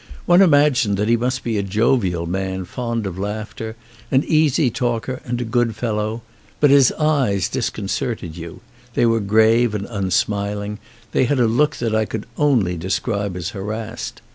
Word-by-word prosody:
One 175 +2 +6
im 190 - +6
agined 145 -8 +3
that 105 +2 -1
he 120 - +5
must 125 +2 -1
be 115 -3 -1
a - - +1
jovial 100 -3 +1
man 95 +1 -3
fond 115 +1 -3
of 95 -1 -5
laughter, 110 +2 -5 0.3
an 135 +2 +3
easy 155 -4 +2
talker 120 +2 -2
and 120 0 -2
a - - -1
good 115 -1 0
fellow; 110 0 -2 0.4
but 145 -2 +5
his 140 -3 +6
eyes 135 - +1
disconcerted 80 -2 -3
you: 85 -1 -9 0.3
they - - +3
were 115 -1 +3
grave 110 +2 +3
and 100 -1 -3
unsmiling; 100 0 -2 0.3
they - - +2
had 135 +1 +1
a 120 - +4
look 125 +7 +2
that 115 -2 -2
I 110 0 +2
could 110 0 -5
only 120 - +2
de 85 +3 -6
scribe 100 0 -1
as 90 -1 -3
harassed. 110 +4 -6
110 Hz, 175 wpm, -20 LUFS, 100-125 Hz, 0.4 s, One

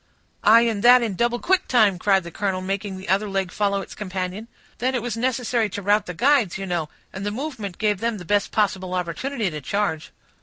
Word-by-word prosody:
"Aye, 225 +3 +7
and 225 -3 0
that 245 0 +7
in 220 -4 -2
double 235 +4 0
quick 375 +9 +1
time," 215 -7 +3
cried 195 -1 +3
the 170 - -9
colonel, 190 +1 -2
making 195 +1 -3
the 190 +2 -10
other 200 +2 +1
leg 195 -2 -2
follow 200 -1 0
its - - -10
companion. 190 +1 -5 0.3
"Then 260 +2 0
it 245 - 0
was 240 -2 -3
necessary 240 -2 0
to 205 - -5
rout 205 +1 +2
the 180 - -6
guides, 245 - +3
you 195 - -5
know, 170 -4 -2 0.2
and 190 - -6
the 205 - -1
movement 225 - -5
gave 210 -3 0
them 230 0 -1
the 180 - -9
best 205 +3 +1
possible 190 -3 0
opportunity 195 +5 -2
to 150 -1 -6
charge." 195 0 -2
205 Hz, 220 wpm, -23 LUFS, 190-230 Hz, 0.3 s, Aye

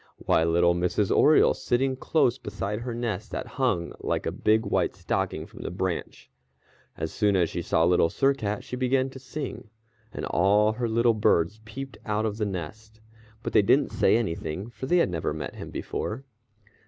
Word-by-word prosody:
Why, 80 - +2
little 85 +1 +3
Mrs. 90 +3 +1
Oriole 155 +2 +5
sitting 130 +1 0
close 130 -2 +1
beside 105 0 -4
her 120 0 -5
nest 110 -3 -3
that - - -4 0.2
hung 90 -10 +1
like - - -2
a - - -1
big 110 +1 +2
white 100 - 0
stocking - - -2
from - - -12
the - - -4
branch. 90 0 -4 0.7
As 80 0 -3
soon 105 -2 +2
as 85 -3 +2
she 85 - -3
saw 80 -1 +1
Little 85 -1 +4
Sir 140 0 +2
Cat 105 -6 -3
she - - -6
began 130 +1 +1
to 130 - -10
sing, 130 -3 -6 0.4
and - - -5
all 105 +4 +3
her 120 +1 -2
little 115 +1 +3
birds 105 -1 +1
peeped 135 +5 -8
out 110 0 -1
of 105 -1 -2
the 105 -2 -1
nest, 105 +5 -7 0.4
but - - -4
they - - +6
didn't 135 +8 +3
say - - +3
anything, 95 0 -3
for 130 - -7
they 175 - +3
had 170 - +2
never 80 -3 -2
met 80 - -5
him - - -7
before. 135 - -4
110 Hz, 190 wpm, -26 LUFS, 90-125 Hz, 0.7 s, they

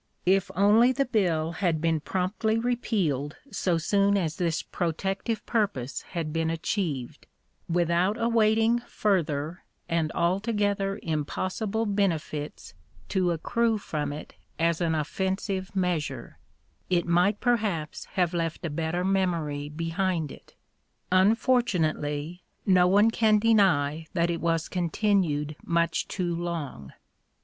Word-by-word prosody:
If 190 +1 +3
only 215 +6 +5
the 275 +1 +1
bill 175 -9 +1
had 170 -2 0
been 165 0 +1
promptly 195 +7 -1
repealed 195 - -1 0.2
so 185 -4 0
soon 200 +4 +2
as 165 -4 -1
this 170 -3 0
protective 195 +6 -2
purpose 200 - -1
had 165 -4 -5
been 165 0 0
achieved, 160 - -3 0.4
without 175 +5 +1
awaiting 225 0 +3
further 170 -8 -1 0.2
and 165 -2 0
altogether 200 +2 0
impossible 185 +8 -2
benefits 165 -7 -2 0.4
to 185 -2 +1
accrue 225 +7 +1
from 150 -7 -3
it 150 +1 -8 0.2
as 165 +1 +1
an 165 -2 +1
offensive 190 +5 -2
measure, 150 - -2 0.5
it 175 -2 +2
might 180 +4 +2
perhaps 210 -11 -1
have 180 -2 0
left 165 -1 -2
a 165 - -2
better 165 +3 -1
memory 165 -7 0
behind 165 0 -1
it. - - -15 0.6
Unfortunately 180 - +1 0.2
no 185 -2 +5
one 205 +4 +5
can 220 -2 +4
deny 175 -9 +3
that 170 -1 +1
it 170 - -3
was 165 -1 0
continued 170 -4 0
much 170 0 0
too 175 -3 -2
long. 165 - -5
175 Hz, 120 wpm, -27 LUFS, 160-200 Hz, 0.6 s, only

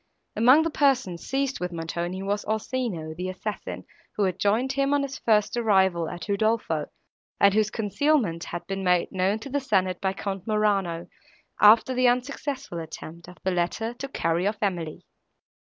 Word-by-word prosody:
Among 255 +8 +6
the 330 - -1
persons, 265 - +1
seized 270 0 -1
with 180 0 -3
Montoni, 170 +3 -4
was 205 +1 -1
Orsino, 215 -7 -2
the 180 +3 -4
assassin, 180 - -5 0.3
who 210 - +1
had 185 -1 -1
joined 225 +7 +2
him 275 +1 +1
on 285 - +1
his 280 +1 -5
first 210 -1 +2
arrival 190 -7 +2
at 170 -2 -7
Udolpho, 200 -7 0 0.5
and 200 -1 +5
whose 215 0 +2
concealment 210 - 0
had 175 0 -6
been 195 +1 -4
made 180 -1 +2
known 190 +3 +1
to 225 +5 -9
the 285 - +1
senate 190 -8 0
by 190 -1 0
Count 195 -1 -5
Morano, 200 -6 +1 0.6
after 225 +5 +7
the 255 0 +3
unsuccessful 255 - -2
attempt 165 +1 -9
of 180 - -12
the 190 - +1
latter 180 +6 -1
to 275 +3 -6
carry 170 -7 0
off 210 0 -1
Emily. 175 -6 -3
200 Hz, 170 wpm, -26 LUFS, 175-240 Hz, 0.6 s, after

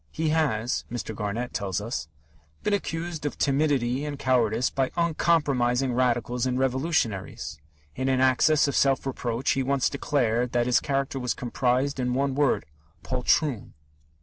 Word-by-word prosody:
"He 160 0 -1
has," 130 -7 0
Mr. 120 -2 -4
Garnett 110 +4 -3
tells 95 -1 -2
us, 105 -6 -4 0.6
"been 210 - +1
accused 165 -5 -3
of 145 - -3
timidity 140 -3 +1
and 145 -1 -4
cowardice 120 -3 +1
by 135 -1 0
uncompromising 140 -7 +2
Radicals 125 0 0
and 125 0 -1
Revolutionaries.... 120 - -1 0.4
In 130 0 -1
an 130 -1 +2
access 130 +4 +4
of 140 - -2
self 135 -1 +2
reproach 125 -2 -1
he 135 - +1
once 135 0 +1
declared 125 -4 0
that 120 -1 +2
his 125 -1 +3
character 135 0 -2
was 125 -1 -1
comprised 125 +3 0
in 125 0 0
one 135 0 +1
word 140 -1 +1 0.4
'poltroon!'" 130 -1 0
130 Hz, 150 wpm, -26 LUFS, 120-140 Hz, 0.6 s, access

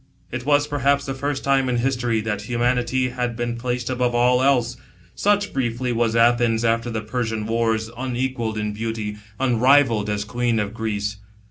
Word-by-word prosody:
It 120 0 -5
wa^ 145 0 +3
perhaps 140 -1 +1
ihe 135 - -3
first 140 0 -3
time 135 -1 +2
in 125 - +1
history, 120 -3 0
that 105 -2 -3
humanity 125 +1 +1
had 120 -1 -3
been 120 0 -2
placed 125 0 -3
above 125 -1 0
all 125 +1 +4
else., 125 -3 +2 0.4
Such, 205 0 +1
briqfly, 125 -1 -1
was 115 -1 +1
Athens 115 -1 +3
after 115 +1 +1
the 110 -2 -3
Persian 110 -1 -3
wars, 115 0 0
unequalled 125 -3 -2
in 105 -1 -2
beauty, 110 -1 -4 0.2
unrivalled 125 -3 +3
as 105 0 -2
queen 120 0 0
of 105 0 -2
Greece. 105 -2 -3
120 Hz, 165 wpm, -22 LUFS, 115-130 Hz, 0.4 s, all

